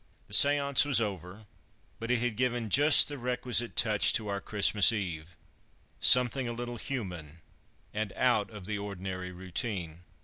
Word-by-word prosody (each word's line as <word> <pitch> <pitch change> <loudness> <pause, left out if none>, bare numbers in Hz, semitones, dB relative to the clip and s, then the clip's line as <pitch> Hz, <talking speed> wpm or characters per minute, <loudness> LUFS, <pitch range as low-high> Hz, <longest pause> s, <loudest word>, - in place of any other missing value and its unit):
The - - -14
séance 140 -1 +4
was 145 -5 +1
over, 100 -1 -6 0.5
but 115 - -7
it 125 -2 0
had 120 -3 -2
given 120 -2 -2
just 145 +5 +6
the 145 -2 -6
requisite 125 -1 -3
touch 105 -2 +3
to 105 -2 -1
our 100 0 -3
Christmas 105 0 +3
Eve 90 -5 -6 0.6
something 125 +1 +3
a 120 - -4
little 120 0 -7
human 90 - -7 0.5
and 105 -1 -4
out 115 -5 0
of 105 -4 -12
the 105 +1 -5
ordinary 95 -2 -7
routine. 90 -2 -5
110 Hz, 150 wpm, -28 LUFS, 95-125 Hz, 0.6 s, just